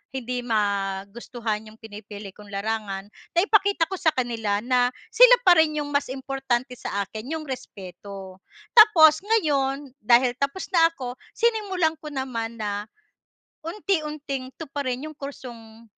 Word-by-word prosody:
hindi 250 -1 -3
magustuhan 210 +1 -2
'yong 215 +1 -15
pinipili 210 -2 -9
kong 210 -1 -14
larangan. 200 -1 -3 0.3
Naipakita 400 -3 +3
ko 385 - -3
sa 320 -3 +3
kanila 225 -5 -1
na 245 0 +3 0.2
sila - - +8
pa 355 -2 +7
rin 305 -1 +3
'yong 290 - -5
mas 285 -2 0
importante 265 -2 -2
sa 200 0 -2
akin, 220 +9 -7
'yong 310 - -8
respeto. 195 -5 -8 0.4
Tapos 345 -9 +7
ngayon, 285 -10 0
dahil 240 +3 +4
tapos 280 +7 -2
na 330 -2 +6
ako, 255 -5 -6 0.2
sinimulan 405 -8 +1
ko 310 -1 -8
naman 235 -4 -4
na 205 -1 -3 0.8
unti-unting 300 -8 -3
tuparin 280 -3 -4
'yong 310 - -14
kursong 235 -5 -10
255 Hz, 130 wpm, -24 LUFS, 220-310 Hz, 0.8 s, sila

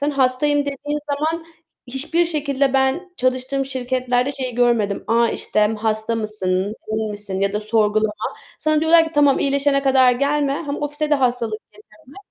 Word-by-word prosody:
Sen 290 +1 0
hastayım 275 +2 +2
dediğin 285 +1 -3
zaman 320 +3 -2 0.4
hiçbir 285 +7 0
şekilde 280 -4 0
ben 270 +8 0
çalıştığım 255 +1 -1
şirketlerde 255 0 -1
şeyi 255 -3 -4
görmedim. 235 -5 +1
A, 230 +1 +3
işte 210 - -1 0.2
hasta 220 +1 -1
mısın, 210 -2 -1 0.2
değil 215 0 -2
misin 205 -2 -3
ya 200 0 +1
da 210 - -1
sorgulama. 215 -1 +2 0.4
Sana 310 -1 +1
diyorlar 325 +1 +5
ki 320 - -7
tamam 290 -2 +4
iyileşene 280 0 +1
kadar 260 -2 +4
gelme. 280 +2 0
Hem 285 - -3
ofise 295 +1 -2
de - - +5
hastalık 240 -5 -1
getirme. 215 - -20
260 Hz, 155 wpm, -20 LUFS, 220-285 Hz, 0.4 s, diyorlar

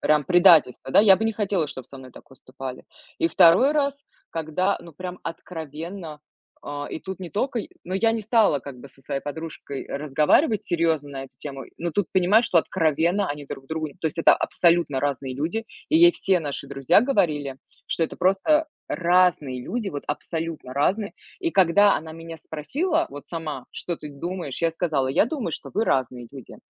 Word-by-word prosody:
прям 150 -2 +3
предательство, 170 -8 +5
да, - - +6
я 195 -3 +7
бы 220 - -2
не 225 - +1
хотела, 200 -6 0
чтоб 130 -3 -8
со 135 - -12
мной 130 -1 -12
так - - -15
поступали. 130 -1 -9 0.3
И - - +2
2 175 - +6
раз, 280 -1 0 0.3
когда, 165 +5 -1
ну, 170 -2 -13
прям 180 +3 -7
откровенно, 165 0 -7 0.4
э, 145 0 -5
и - - -5
тут 190 -1 -7
не 175 - -7
тока 245 +3 -1
й - - -9 0.2
Ну, 185 - -4
я 225 +3 +3
не 225 - -2
стала, 215 - +3
как 135 -1 -10
бы, 140 - -11
со 135 - -18
своей 135 +1 -3
подружкой 150 -2 -6
разговаривать 150 - +2
серьёзно 165 -4 0
на 135 -1 -6
эту - - -17
тему, 135 -2 -7
но 170 +1 -2
тут 190 +2 0
понимаешь, 195 +5 +4
что 170 - +3
откровенно 170 +4 +1
они 145 -1 -6
друг 135 0 -8
другу 160 0 -3
н 140 - -17
то 160 - -2
есть, 160 - -4
это - - +6
абсолютно 170 -6 +2
разные 135 -2 -2
люди. 170 - -2 0.2
И 320 - +3
ей 345 +1 +7
все 190 -2 +1
наши 140 -2 -5
друзья 135 +5 +3
говорили, 150 - 0 0.3
что - - -1
это - - -7
просто 300 - +2 0.2
разные 170 -7 +2
люди, 230 - -3
вот 145 -6 -5
абсолютно 160 -3 -4
разные. 200 +9 0 0.3
И 340 -3 0
когда 200 - +5
она 160 +1 -7
меня 165 0 -9
спросила, 160 - -2
вот 145 0 -10
сама: 155 -6 -5
"Что 175 -2 -5
ты 150 - -9
думаешь?" 170 0 -5
Я 165 -1 +2
сказала: 155 -6 -1
"Я 135 - +3
думаю, 245 - -3
что - - -7
вы 220 +2 +1
разные 125 -2 0
люди". 135 -3 -11
165 Hz, 195 wpm, -24 LUFS, 145-190 Hz, 0.4 s, я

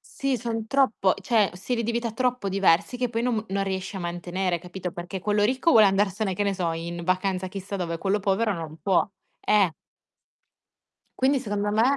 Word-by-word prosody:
sì, 275 -1 -2
son 225 -2 -3
troppo 225 -7 +2
cioè 220 -5 +2
stili 235 +6 -2
di 235 - -1
vita 235 -1 -2
troppo 250 -3 0
diversi 195 +3 +2
che 250 0 0
poi 230 0 -1
non 245 -1 +1
m 215 - -2
non 195 0 0
riesci 190 +1 -4
a - - -4
mantenere, 175 +1 -2
capito, 180 +1 -6
perché 175 +2 -6
quello 210 +1 +1
ricco 260 +8 +2
vuole 215 -6 +7
andarsene, 195 0 +1
che 205 - -1
ne 200 -1 0
so, 175 -3 -1
in 170 +1 -5
vacanza 185 +1 0
chissà 195 +1 -5
dove, 170 -2 -3
quello 195 +3 +1
povero 205 +3 +1
non 160 -2 -7
può. 190 -1 +2 0.3
Eh! 200 -5 +3 1.5
Quindi, 270 +2 +3
secondo 205 -3 -2
me, 235 +6 +3
200 Hz, 190 wpm, -25 LUFS, 185-225 Hz, 1.5 s, vuole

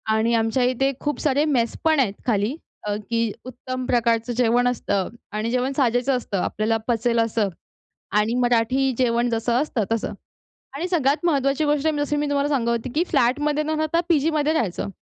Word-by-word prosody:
आणि 230 +2 +1
आमच्या 225 +3 +1
इथे 255 +2 +1
खूप 295 0 -2
सारे 290 0 +2
मेस 245 -6 +1
पण 315 -2 +3
आहेत 210 -7 +2
खाली, 220 +4 +1 0.3
अ, 205 - 0
की 230 -2 0
उत्तम 255 0 -5
प्रकारचं 235 0 +1
जेवण 245 +1 +2
असतं 200 -5 -1 0.2
आणि 215 +2 -2
जेवण 255 +2 0
साजेचं 250 0 +2
असतं. 205 -5 -4
आपल्याला 220 +1 0
पचेल 235 0 +1
असं 225 -2 +1 0.7
आणि 220 +3 +1
मराठी 245 +3 +2
जेवण 240 -1 +2
जसं 230 +1 0
असतं 250 -7 -1
तसं. 225 -1 -1 0.6
आणि 330 +6 -2
सगळ्यात 310 -2 +1
महत्वाची 280 -2 +1
गोष्ट 295 +1 +1
जसं 290 0 -1
मी 295 - 0
तुम्हाला 285 0 +1
सांगत 245 -5 +1
होती, 235 +2 -1
की 325 - +3
फ्लॅटमध्ये 295 +5 +1
न 310 - -4
राहता 315 +2 +1
पीजीमध्ये 310 -1 +2
राहायचं. 210 - -1
250 Hz, 170 wpm, -23 LUFS, 230-290 Hz, 0.7 s, पण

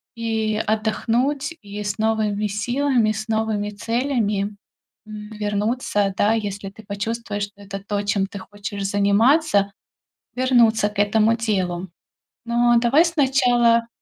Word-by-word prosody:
и 220 -1 -1
отдохнуть, 240 +7 0
и 205 0 -7
с 205 -1 -3
новыми 215 -1 0
силами, 240 +2 +1
с 215 +3 -5
новыми 220 -2 0
целями, 210 -2 -1 0.5
м, 210 0 -8
вернуться, 210 -1 -1
да, 215 +2 +3
если 200 -3 -3
ты 215 +2 -15
почувствуешь, 205 0 -3
что 205 0 -8
это 195 0 -6
то, 205 -1 -1
чем 200 -1 0
ты 200 0 -9
хочешь 205 +1 -7
заниматься, 205 +3 +3 0.7
вернуться 235 -4 +3
к 210 - -13
этому 215 +2 +3
делу. 190 -5 -2 0.6
Но 240 0 +3
давай 275 +8 +4
сначала 245 -7 +3
215 Hz, 125 wpm, -22 LUFS, 205-235 Hz, 0.7 s, давай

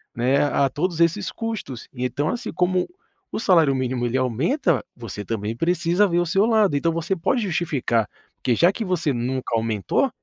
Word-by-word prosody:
né, 125 +4 +2
a 140 -1 +2
todos 170 +4 -2
esses 170 +4 +2
custos. 220 - -5
E 125 0 -3
então, 145 +5 -1
assim, 240 - -4
como 180 0 +1 0.4
o - - -3
salário 165 -10 +4
mínimo 130 -1 -1
ele 120 +2 0
aumenta, 135 - +1
você 105 -4 -7
também 110 +1 -3
precisa 175 +5 +2
ver 175 -2 +1
o 175 - +1
seu 195 +5 +2
lado. 215 -8 +3
Então 165 +3 +1
você 165 +3 -1
pode 235 +8 0
justificar, 150 - 0 0.3
porque 120 -3 0
já 175 +8 +5
que 220 +2 -4
você 170 -6 0
nunca 125 +1 -2
aumentou, 110 - 0
160 Hz, 180 wpm, -23 LUFS, 125-185 Hz, 0.4 s, já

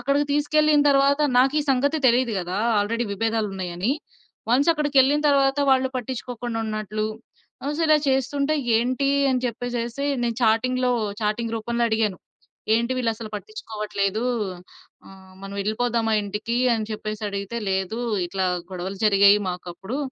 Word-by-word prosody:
అక్కడికి 280 +3 +1
తీసుకెళ్ళిన 300 0 +3
తర్వాత, 280 +1 +3 0.2
నాకీ 270 +4 +3
సంగతి 285 +4 +1
తెలీదు 240 -1 +2
గదా! 180 +3 -4 0.2
ఆల్రెడీ 230 +3 -1
విభేదాలున్నాయని. 200 -1 -1 0.6
వన్స్ 275 +7 +4
అక్కడికెళ్ళిన 290 -1 +3
తరవాత, 275 0 +3
వాళ్ళు 260 0 +3
పట్టించుకోకుండా 245 -1 -4
ఉన్నట్లు, 215 0 -3 0.6
అసల 310 +1 +1 0.2
చేస్తుంటే, 280 +3 +1 0.2
ఏంటి 255 +4 0 0.2
అని 255 -1 +1
చెప్పేసేసి 240 +2 -3 0.2
నేను 235 -2 -1
చాటింగ్‌లో 250 +3 +2 0.3
చాటింగ్ 225 +2 -1
రూపంలో 235 +2 -2
అడిగాను. 220 -4 0 0.6
"ఏంటి 235 +3 +1
వీళ్ళసలు 225 -2 -2
పట్టించుకోవట్లేదు? 215 - -3 0.8
ఆహ్, 190 -1 -15
మనం 195 0 -7
ఎళ్ళిపోదామా 225 +2 0
ఇంటికీ?" 210 +4 -3 0.2
అని 220 -1 -2
చెప్పేసడిగితే, 215 0 -4
"లేదు, 190 +4 -1 0.3
ఇట్లా 190 +1 -1 0.2
గొడవలు 190 +2 -5
జరిగాయి 200 0 +6
మాకప్పుడు, 180 +7 -5
230 Hz, 115 wpm, -23 LUFS, 210-265 Hz, 0.8 s, జరిగాయి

